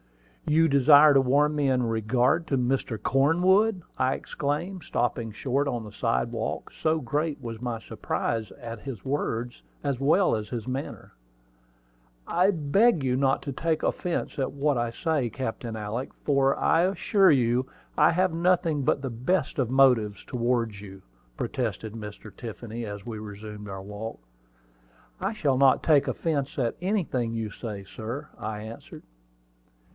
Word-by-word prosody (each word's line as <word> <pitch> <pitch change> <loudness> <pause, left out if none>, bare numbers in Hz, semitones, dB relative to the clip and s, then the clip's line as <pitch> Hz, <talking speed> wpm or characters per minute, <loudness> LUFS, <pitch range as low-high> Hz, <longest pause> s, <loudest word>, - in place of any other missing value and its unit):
"You 160 +2 +4
desire 145 +1 +7
to 135 - +6
warn 145 +4 +3
me 145 -2 +2
in 130 -1 +2
regard 120 +8 +1
to 135 - +1
Mr. 125 -3 -1
Cornwood!" 180 - +3 0.2
I 130 +1 +2
exclaimed, 165 +6 -3
stopping 115 -2 -1
short 135 +6 -1
on 120 -4 -2
the 105 - -9
sidewalk, 60 -8 -2
so 160 0 0
great 150 +4 -2
was 115 -1 -7
my 120 -2 -2
surprise 110 -1 -3
at 115 -1 -8
his 120 -5 -8
words, 120 - -2 0.2
as 140 -3 -1
well 155 +6 +3
as 105 -1 -4
his 115 -2 -5
manner. 130 +2 -5 1.1
"I 180 +3 +3
beg 175 - +3
you 130 -1 +1
will 130 - +1
not 135 0 +2
take 155 +3 -1
any - - +3
offence 175 -4 -3
at 135 - 0
what 145 +1 +1
I 120 -1 0
say, 145 0 -1
Captain 115 -1 -4
Alick, 110 +4 -4
for 140 -1 +3
I 165 - +3
assure 190 +1 +3
you 125 -1 +2 0.3
I - - +5
have 180 +1 +1
nothing 170 -3 +2
but 140 +1 +1
the 135 - -3
best 135 +7 -1
of 125 -4 +1
motives 125 -7 +3
towards 120 -4 -1
you," 95 -2 -11 0.3
protested 110 -3 -3
Mr. 105 -2 -9
Tiffany, 115 0 -6
as 105 0 -7
we 115 -3 -5
resumed 105 0 -8
our 95 0 -6
walk. 105 +3 -7 1.0
"I 195 +2 0
shall 145 - 0
not 135 -1 +5
take 150 -4 +4
offence 145 -4 -2
at 120 -4 0
anything 170 - -1
you 110 -2 -3
say, 100 -3 -7
sir," 120 +9 -6
I 105 -1 -4
answered. 110 +1 -10
130 Hz, 155 wpm, -27 LUFS, 115-150 Hz, 1.1 s, desire